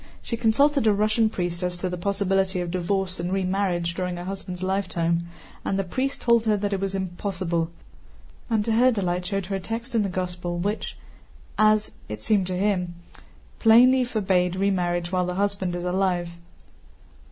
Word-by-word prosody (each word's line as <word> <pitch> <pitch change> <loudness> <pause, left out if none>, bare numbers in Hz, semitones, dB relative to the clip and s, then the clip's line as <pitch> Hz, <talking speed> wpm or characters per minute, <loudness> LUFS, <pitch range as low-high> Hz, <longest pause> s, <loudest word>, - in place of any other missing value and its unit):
She 235 - -3
consulted 240 +3 +3
a 215 - +5
Russian 215 +2 +2
priest 175 -3 -3
as 180 -1 -2
to 185 - -2
the 180 - -3
possibility 195 0 0
of 175 -1 -3
divorce 185 +1 -1
and 175 +1 -2
remarriage 185 -2 0
during 180 0 -3
a 175 - -6
husband's 185 -1 -6
lifetime, 170 -3 0 0.4
and 195 - -1
the 195 - +1
priest 260 +9 -2
told 235 -1 +3
her 210 -1 +3
that 205 0 -1
it 195 - 0
was 195 0 -2
impossible, 180 -3 -2 0.8
and 220 -3 +1
to 230 - 0
her 245 +3 +5
delight 180 -5 -1
showed 195 0 -2
her 195 +1 -2
a - - -5
text 230 +6 -5
in 225 - +3
the 200 - 0
Gospel 180 -1 -3
which 205 +5 -3 0.6
(as 215 0 +3 0.2
it 105 0 -6
seemed 200 -4 +2
to 185 -1 -2
him) 180 -3 0 0.6
plainly 250 +3 +6
forbids 185 -6 +1
remarriage 175 -3 0
while 180 -1 +1
the 180 - -2
husband 195 -2 -1
is 175 - -4
alive. 180 -1 0
190 Hz, 175 wpm, -25 LUFS, 180-210 Hz, 0.8 s, plainly